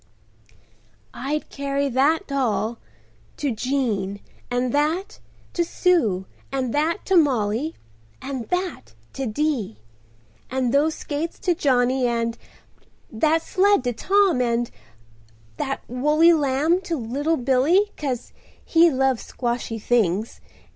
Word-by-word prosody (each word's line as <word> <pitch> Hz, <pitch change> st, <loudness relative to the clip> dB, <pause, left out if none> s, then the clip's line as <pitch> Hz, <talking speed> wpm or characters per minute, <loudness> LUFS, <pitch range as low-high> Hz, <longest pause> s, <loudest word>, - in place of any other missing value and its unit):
"I'd 275 Hz, +5 st, -3 dB
carry 280 Hz, 0 st, -1 dB
that 280 Hz, +8 st, +2 dB
doll—to 210 Hz, -, -4 dB
Jean, 220 Hz, -5 st, -1 dB, 0.3 s
and 245 Hz, 0 st, -1 dB
that—to 325 Hz, +3 st, -2 dB
Sue, 315 Hz, -, +1 dB, 0.3 s
and 260 Hz, -3 st, -2 dB
that—to 335 Hz, +6 st, 0 dB
Mollie, 265 Hz, -, +2 dB, 0.4 s
and 265 Hz, -4 st, -5 dB
that—to 255 Hz, -, -4 dB
Dee, 235 Hz, -, -1 dB, 0.7 s
and 255 Hz, -2 st, 0 dB
those 305 Hz, +3 st, +3 dB
skates 310 Hz, +3 st, -4 dB
to 360 Hz, -4 st, +2 dB
Johnny, 255 Hz, -5 st, +2 dB
and—that 235 Hz, +5 st, -3 dB
sled 400 Hz, -5 st, +3 dB
to 245 Hz, -1 st, -1 dB
Tom, 380 Hz, -, +2 dB
and—that 110 Hz, -, -5 dB
woolly 300 Hz, +7 st, +4 dB
lamb 300 Hz, +4 st, +2 dB
to 340 Hz, -3 st, -3 dB
little 285 Hz, +7 st, -1 dB
Billy, 275 Hz, +11 st, +3 dB
'cause 260 Hz, -5 st, -4 dB, 0.3 s
he 335 Hz, +1 st, +5 dB
loves 265 Hz, -3 st, +1 dB
squshy 240 Hz, -2 st, -2 dB
things. 215 Hz, -2 st, 0 dB
265 Hz, 100 wpm, -23 LUFS, 230-310 Hz, 0.7 s, he